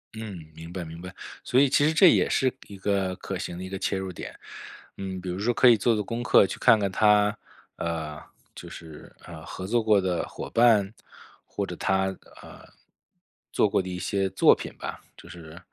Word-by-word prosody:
嗯， 105 Hz, -7 st, -8 dB
明 80 Hz, +1 st, -11 dB
白 90 Hz, 0 st, -5 dB
明 80 Hz, +1 st, -10 dB
白。 90 Hz, +1 st, -9 dB, 0.3 s
所 125 Hz, -, +2 dB
以 140 Hz, -, +5 dB
其 145 Hz, +2 st, +3 dB
实 160 Hz, -, +1 dB
这 185 Hz, +4 st, +7 dB
也 -, -, +2 dB
是 130 Hz, -1 st, +1 dB
一 100 Hz, -, -10 dB
个 95 Hz, -1 st, -1 dB
可 -, -, -6 dB
行 85 Hz, -, -6 dB
的 90 Hz, -, -6 dB
一 95 Hz, -, -7 dB
个 95 Hz, 0 st, -5 dB
切 95 Hz, -, -1 dB
入 95 Hz, -1 st, -4 dB
点， -, -, -9 dB, 0.6 s
嗯， 95 Hz, -1 st, -5 dB
比 90 Hz, -, -9 dB
如 90 Hz, -, -4 dB
说 110 Hz, +4 st, +1 dB
可 125 Hz, -, +4 dB
以 120 Hz, -, +8 dB
做 115 Hz, +2 st, +1 dB
做 105 Hz, -, -1 dB
功 115 Hz, +4 st, -4 dB
课 115 Hz, -, +5 dB
去 -, -, -5 dB
看 110 Hz, -, +5 dB
看 100 Hz, -2 st, -1 dB
他， 105 Hz, 0 st, +3 dB, 0.4 s
呃， 80 Hz, -2 st, -4 dB, 0.3 s
就 -, -, -10 dB
是， 80 Hz, -3 st, -12 dB
呃， 80 Hz, -2 st, -10 dB
合 95 Hz, -, -7 dB
作 115 Hz, +4 st, +1 dB
过 105 Hz, -2 st, +4 dB
的 90 Hz, -2 st, -1 dB
伙 -, -, -7 dB
伴， 110 Hz, -3 st, +4 dB, 0.5 s
或 -, -, -4 dB
者 -, -, -7 dB
他， 95 Hz, 0 st, 0 dB, 0.3 s
呃， -, -, -13 dB, 0.9 s
做 -, -, +3 dB
过 -, -, +1 dB
的 95 Hz, -, -7 dB
一 90 Hz, -, -5 dB
些 95 Hz, +1 st, -1 dB
作 -, -, +5 dB
品 -, -, -8 dB
吧， -, -, -7 dB, 0.2 s
就 -, -, -14 dB
是， 85 Hz, 0 st, -11 dB
95 Hz, 230 characters per minute, -26 LUFS, 90-110 Hz, 0.9 s, 以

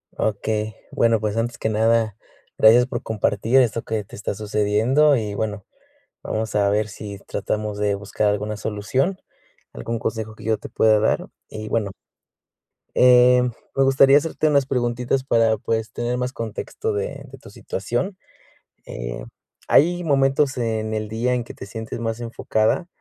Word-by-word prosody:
Okey, 110 Hz, +1 st, -1 dB, 0.2 s
bueno, 115 Hz, -2 st, +3 dB
pues, 105 Hz, 0 st, -2 dB
antes 115 Hz, +1 st, -2 dB
que 110 Hz, -, -1 dB
nada, 110 Hz, -1 st, +2 dB, 0.4 s
gracias 120 Hz, +3 st, +6 dB
por 120 Hz, -, -4 dB
compartir 110 Hz, +3 st, +1 dB
esto 115 Hz, -1 st, 0 dB
que 110 Hz, -2 st, -2 dB
te -, -, -12 dB
está 100 Hz, -, -3 dB
sucediendo 110 Hz, +8 st, +2 dB
y, 105 Hz, -2 st, -3 dB
bueno, 105 Hz, -1 st, -3 dB, 0.6 s
vamos 110 Hz, 0 st, -3 dB
a 100 Hz, -1 st, +3 dB
ver 105 Hz, +1 st, +1 dB
si 100 Hz, -1 st, -8 dB
tratamos 105 Hz, +1 st, -3 dB
de 105 Hz, -1 st, +1 dB
buscar 100 Hz, +1 st, -2 dB
alguna 105 Hz, +1 st, -2 dB
solución, 130 Hz, -, -1 dB, 0.5 s
algún 115 Hz, -, -4 dB
consejo 110 Hz, -1 st, -4 dB
que 110 Hz, -, -14 dB
yo 110 Hz, 0 st, +1 dB
te -, -, -9 dB
pueda 110 Hz, -1 st, +3 dB
dar. 110 Hz, -, +1 dB, 0.2 s
Y, 110 Hz, 0 st, -7 dB
bueno 105 Hz, -4 st, -1 dB, 1.0 s
eh, 125 Hz, 0 st, +6 dB, 0.3 s
me 135 Hz, -, +3 dB
gustaría 135 Hz, +1 st, +6 dB
hacerte 155 Hz, +1 st, 0 dB
unas 140 Hz, -3 st, +3 dB
preguntitas 125 Hz, 0 st, -1 dB
para, 115 Hz, -4 st, +2 dB
pues, 110 Hz, +1 st, -2 dB
tener 120 Hz, +1 st, -2 dB
más 125 Hz, +1 st, -2 dB
contexto 115 Hz, -, -4 dB
de 455 Hz, +4 st, -4 dB
de -, -, -11 dB
tu -, -, -14 dB
situación. 200 Hz, -, -3 dB, 0.7 s
Eh, -, -, -6 dB, 0.4 s
¿hay 175 Hz, +4 st, +4 dB
momentos 135 Hz, -2 st, +2 dB
en 110 Hz, -2 st, -2 dB
el 110 Hz, -1 st, -3 dB
día 120 Hz, +3 st, 0 dB
en 120 Hz, -1 st, -1 dB
que -, -, -10 dB
te -, -, -9 dB
sientes 110 Hz, +3 st, -6 dB
más 115 Hz, 0 st, -3 dB
enfocada, 115 Hz, +6 st, 0 dB
110 Hz, 160 wpm, -22 LUFS, 105-125 Hz, 1.0 s, gracias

